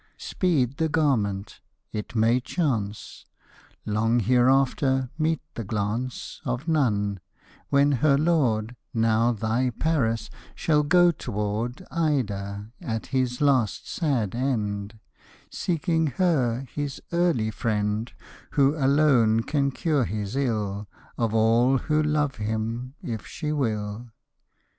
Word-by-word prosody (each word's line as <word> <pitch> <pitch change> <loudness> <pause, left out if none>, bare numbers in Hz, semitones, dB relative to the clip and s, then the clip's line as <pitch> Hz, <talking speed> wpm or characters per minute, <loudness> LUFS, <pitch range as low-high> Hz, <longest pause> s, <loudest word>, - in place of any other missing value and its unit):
Speed 140 -8 0
the 160 -1 +1
garment! 105 -10 0 0.3
It 105 +2 -5
may 115 +3 +3
chance. 120 - -3 0.6
Long 115 +3 +1
hereafter, 130 +2 +2
meet 160 0 0
the 115 - -5
glance 110 +5 -3
Of 130 +2 -3
none; 105 - +1 0.5
when 140 +1 +4
her 140 +1 +3
lord, 125 -8 +1 0.2
Now 115 +1 +3
thy 115 +3 0
Paris, 120 -4 0 0.2
shall 150 -2 +2
go 175 +4 +5
t'ward 110 - -3
Ida, 105 -10 -1
at 110 -1 -3
his 130 -1 0
last 130 -7 +2
sad 130 - -1
end, 110 -5 -2 0.5
Seeking 165 -2 0
her, 135 -10 +2
his 145 -2 -3
early 170 -11 +1
friend, 105 0 -1 0.4
Who 140 +1 +3
alone 135 -6 +3
can 140 0 +1
cure 145 -1 0
his 105 +1 -4
ill 105 -6 -1 0.3
Of 115 -2 -1
all 115 +4 +4
who 155 +3 +1
love 150 -2 0
him, 110 +4 -3
if 115 -3 -5
she 150 -2 -4
will. 110 -4 -2
125 Hz, 115 wpm, -25 LUFS, 110-145 Hz, 0.6 s, go